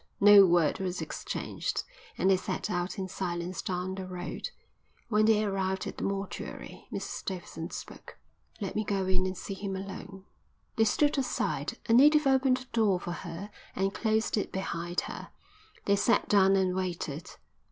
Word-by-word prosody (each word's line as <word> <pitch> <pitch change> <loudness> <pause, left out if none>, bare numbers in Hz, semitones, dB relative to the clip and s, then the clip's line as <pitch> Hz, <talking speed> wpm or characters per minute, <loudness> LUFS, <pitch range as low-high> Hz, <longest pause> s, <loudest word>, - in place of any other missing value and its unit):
No 200 -1 +9
word 170 -3 +3
was 185 -1 -2
exchanged, - - -3 0.3
and - - +2
they - - +6
set 185 +3 -3
out 175 +1 -2
in 190 -1 -2
silence 175 -1 -3
down 185 0 -2
the 190 -1 -5
road. 180 -1 -5 0.6
When 215 -1 +4
they 215 -1 +4
arrived 190 -2 -1
at - - -6
the - - -4
mortuary 195 0 -5
Mrs - - -4
Davidson 175 -3 -5
spoke. - - -9 0.4
"Let 195 -4 -4
me 215 - +1
go 195 -2 0
in 185 0 +1
and 185 -1 -4
see 195 - -5
him 195 0 -4
alone." 195 0 -7 0.5
They 225 - +4
stood 290 +6 +3
aside. 260 - -1
A 225 - +3
native 300 +5 +7
opened 265 -1 +3
a - - -10
door 205 -5 +3
for 175 - -5
her 175 +4 -6 0.2
and 195 +1 0
closed 220 0 +1
it 205 - -1
behind 175 -2 -2
her. - - -7 0.6
They 200 0 +3
sat 230 +4 +3
down 195 -1 +5
and 190 -1 +2
waited. 175 -3 -3
195 Hz, 170 wpm, -30 LUFS, 185-210 Hz, 0.6 s, No